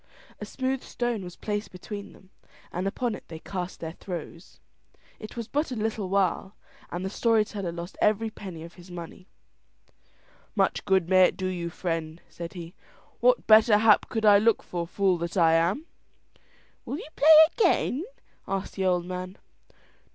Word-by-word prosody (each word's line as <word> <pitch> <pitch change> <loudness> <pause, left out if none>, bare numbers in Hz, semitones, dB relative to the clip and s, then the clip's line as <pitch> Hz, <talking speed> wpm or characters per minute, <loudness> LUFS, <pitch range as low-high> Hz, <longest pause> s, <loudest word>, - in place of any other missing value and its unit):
A 210 - -5
smooth 260 +2 -2
stone 240 -4 -3
was 180 -1 -9
placed 210 0 -4
between 200 +2 -8
them, 190 0 -20 0.4
and 185 +2 -2
upon 240 +3 -1
it - - -9
they 165 - -8
cast 180 +2 -6
their 160 -1 -5
throws. 170 -1 -8 0.6
It 215 +2 -10
was 230 -2 -4
but 295 +3 -1
a - - -2
little 215 -3 -2
while 190 0 0 0.3
and 180 +2 -4
the - - -2
story 225 -1 +2
teller 200 -5 -5
lost 170 +2 -8
every 215 +1 +2
penny 180 -6 -9
of 170 +1 -11
his 180 0 -15
money. 175 +2 -9 1.3
"Much - - +1
good 190 -4 +2
may 185 0 +6
it - - -1
do 185 - -3
you, 175 -2 -3
friend," 165 -2 -4
said 170 -1 -8
he. 170 -2 -8 0.5
"What - - +3
better 220 0 +7
hap 210 -1 +4
could 220 -1 -1
I 205 -1 +7
look 225 +1 +2
for, 170 -1 -4
fool 190 -1 +1
that 170 +3 -4
I 165 -2 +5
am!" 170 - +1 1.0
"Will 280 - -4
you - - -8
play 315 +2 +7 0.2
again?" 325 - +2 0.4
asked 195 0 -3
the 190 - -2
old 180 -1 +1
man. 185 +1 -6
190 Hz, 175 wpm, -27 LUFS, 175-215 Hz, 1.3 s, better